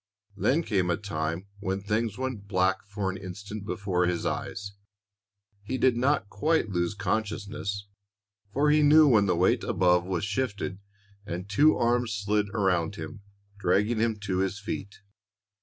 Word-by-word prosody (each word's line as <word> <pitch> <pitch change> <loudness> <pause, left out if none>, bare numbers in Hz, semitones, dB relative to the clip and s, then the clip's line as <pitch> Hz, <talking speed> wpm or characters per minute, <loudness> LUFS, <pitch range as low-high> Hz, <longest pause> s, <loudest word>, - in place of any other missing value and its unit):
Then 140 +10 +2
came 95 - 0
a 85 - +1
time 85 -2 -3
when 95 -1 -2
things 105 +1 -1
went 130 -6 -4
black 95 -1 +1
for 100 -1 -2
an 95 - -6
instant 100 +2 -7
before 95 -5 0
his 90 -1 -1
eyes. 100 0 -3 0.9
He 125 +6 -3
did 130 -2 +3
not 130 -2 +1
quite 150 +4 +1
lose 85 +1 0
consciousness, 100 -1 -2 0.7
for 145 +6 +3
he 150 0 +5
knew 150 +1 +7
when 105 -6 +5
the 90 - +2
weight 90 +2 +2
above 90 -1 +3
was 90 0 -2
lifted 100 -7 -2 0.4
and 95 -2 -5
two 145 +10 +4
arms 120 -1 +1
slid 105 0 0
around 95 -4 +1
him, 105 0 -8 0.4
dragging 100 +5 +2
him 115 0 +1
to 95 -2 -1
his 95 +1 0
feet. 100 0 -6
100 Hz, 155 wpm, -28 LUFS, 95-115 Hz, 0.9 s, knew